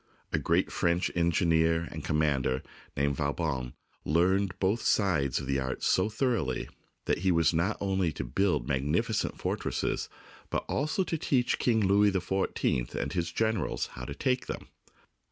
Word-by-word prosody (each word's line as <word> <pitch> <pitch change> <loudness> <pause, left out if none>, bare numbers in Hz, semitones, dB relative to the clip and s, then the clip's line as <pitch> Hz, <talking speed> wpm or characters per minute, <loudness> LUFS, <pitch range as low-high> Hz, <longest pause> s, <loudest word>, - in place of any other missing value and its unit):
A - - +2
great - - +1
French 85 +1 +1
engineer 85 -1 +2
and 80 -1 -6
com 75 - 0
mander, 70 -4 +1 0.3
named 70 0 +1
Vauban, 70 -4 -2 0.3
learned 90 +4 +2
both 100 +5 +1
sides 80 - +2
of 70 - -6
the 70 0 0
art 65 0 -3
so 95 +3 +3
thoroughly 110 - -1 0.4
that - - +1
he 95 0 +2
was 85 -3 +4
able - - +1
not 105 +3 -1
only 95 -4 0
to 70 - -4
build 70 +1 0
magnificent 70 +1 0
fortresses, - - -2 0.4
but - - -2
also 155 +7 0
to 165 -2 -3
teach 125 -4 +1
King 115 -3 +2
Louis 100 +1 +4
XIV 95 -9 -1
and - - -2
his 85 -2 -1
generals 110 -2 0
how 60 - -7
to - - -6
take 125 -1 0
them. - - -6
85 Hz, 160 wpm, -29 LUFS, 70-100 Hz, 0.4 s, was